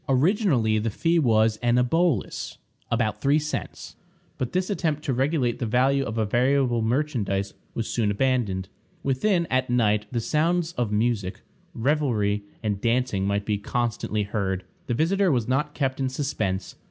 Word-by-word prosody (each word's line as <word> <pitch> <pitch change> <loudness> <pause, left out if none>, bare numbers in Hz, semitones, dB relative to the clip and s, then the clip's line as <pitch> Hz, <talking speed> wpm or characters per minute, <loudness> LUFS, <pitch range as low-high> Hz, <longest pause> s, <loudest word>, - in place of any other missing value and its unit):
Originally 135 - +3
the 115 +2 -1
fee 165 +10 +1
was 110 -5 +3
an 120 +1 +2
obolus 140 - 0 0.3
about 110 -2 0
three 140 +2 +4
cents; 150 0 -4 0.4
but 125 - -2
this 185 +2 -1
attempt 155 -6 -1
to 135 - -1
regulate 130 -2 0
the 120 - -1
value 130 +4 +2
of 110 -3 -4
a 110 - +2
variable 125 +2 +2
merchandise 110 -6 -1 0.2
was 115 - -2
soon 110 -3 0
abandoned. 105 -5 0 0.4
Within, 170 +7 +1
at 130 0 +1
night, 105 -4 +2
the 120 - 0
sounds 165 +6 +1
of 120 -9 -2
music, 105 -3 0 0.3
revelry, 115 -6 +1 0.2
and 105 -2 -1
dancing 115 -5 +1
might 100 0 0
be 105 -2 0
constantly 110 -1 -1
heard. 95 -3 -2 0.2
The 120 - 0
visitor 185 +6 +2
was 120 -5 0
not 150 +4 0
kept 135 -2 -1
in 135 -1 0
suspense. 110 -9 -2
120 Hz, 155 wpm, -25 LUFS, 110-145 Hz, 0.4 s, three